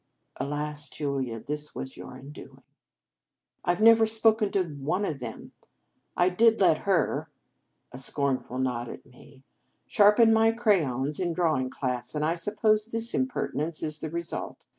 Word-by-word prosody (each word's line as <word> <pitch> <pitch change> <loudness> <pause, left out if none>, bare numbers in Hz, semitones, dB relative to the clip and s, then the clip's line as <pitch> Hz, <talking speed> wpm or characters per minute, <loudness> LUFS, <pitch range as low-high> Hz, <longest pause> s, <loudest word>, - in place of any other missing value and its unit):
(Alas! 150 0 -4
Julia, 135 -6 -3
this 150 +5 -5
was 130 - -6
your - - -10
undoing.) 135 +3 -12 0.5
" - - -56
I 175 - +2
Ve 215 - -2
never 225 0 +7
spoken 220 -1 +3
to 195 - +2
one 160 +5 -3
of 150 -6 -3
them. 115 -3 -8 0.7
I 175 - +4
did 225 +5 +3
let 170 -5 +3
her" 155 -3 0 0.6
(a 125 - -8
scorn 135 0 0
ful 125 - -9
nod 125 -2 -2
at - - -10
me) 135 +1 -18 0.4
"sharpen 215 +2 +5
my 225 0 +4
crayons 150 - +1
in 175 -2 -1
drawing 155 -7 0
class, 125 0 -3
and 150 0 0
I 160 - +1
suppose 215 +4 +1
this 230 0 0
impertinence 165 - -2
is 155 -1 -3
the 155 - -5
result. 170 +1 -5
155 Hz, 160 wpm, -27 LUFS, 135-210 Hz, 0.7 s, never